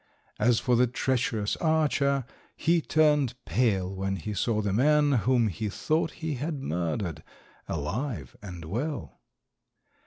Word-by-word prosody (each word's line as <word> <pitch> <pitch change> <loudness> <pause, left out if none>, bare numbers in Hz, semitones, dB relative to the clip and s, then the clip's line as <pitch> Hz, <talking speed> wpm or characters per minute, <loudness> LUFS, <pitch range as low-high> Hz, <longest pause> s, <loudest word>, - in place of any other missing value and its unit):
As 120 -2 +4
for 125 - +2
the 125 +1 +4
treacherous 120 -4 0
archer, 145 -4 +2 0.3
he 165 +1 +2
turned 150 -6 +3
pale 100 -7 +1
when 95 0 -2
he 95 +4 -5
saw 110 +1 0
the 100 -2 0
man, 145 +5 +4
whom 120 -1 +3
he 105 +3 -3
thought 155 +10 0 0.2
he 160 - 0
had 145 +3 -3
murdered, 85 - -2 0.5
alive 85 - -3
and 90 -5 -8
well. 125 - -4
120 Hz, 130 wpm, -28 LUFS, 95-145 Hz, 0.5 s, As